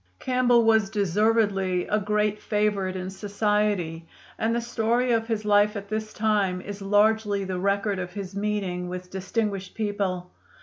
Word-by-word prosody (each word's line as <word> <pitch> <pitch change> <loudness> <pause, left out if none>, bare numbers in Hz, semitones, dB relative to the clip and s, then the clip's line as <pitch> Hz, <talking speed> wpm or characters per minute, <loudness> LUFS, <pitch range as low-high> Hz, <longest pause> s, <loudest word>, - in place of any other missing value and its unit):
Campbell 250 -2 +3
was 220 -3 +4
deservedly 200 -2 +1
a 210 - +1
great 210 0 0
favorite 205 -3 0
in 185 0 -4
society, 200 -4 -1 0.3
and 225 +1 +1
the - - +1
story 235 +1 0
of 225 -1 +1
his 220 -2 -2
life 210 +1 +4
at 200 -1 -6
this 215 0 -3
time 205 -4 +1
is 200 +2 -8
largely 205 0 +2
the 185 -1 -3
record 200 +1 0
of 180 -1 -4
his 195 -1 -6
meeting 200 -4 -2
with 180 0 -7
distinguished 195 0 -3
people. 195 -4 -2
205 Hz, 150 wpm, -25 LUFS, 190-215 Hz, 0.3 s, was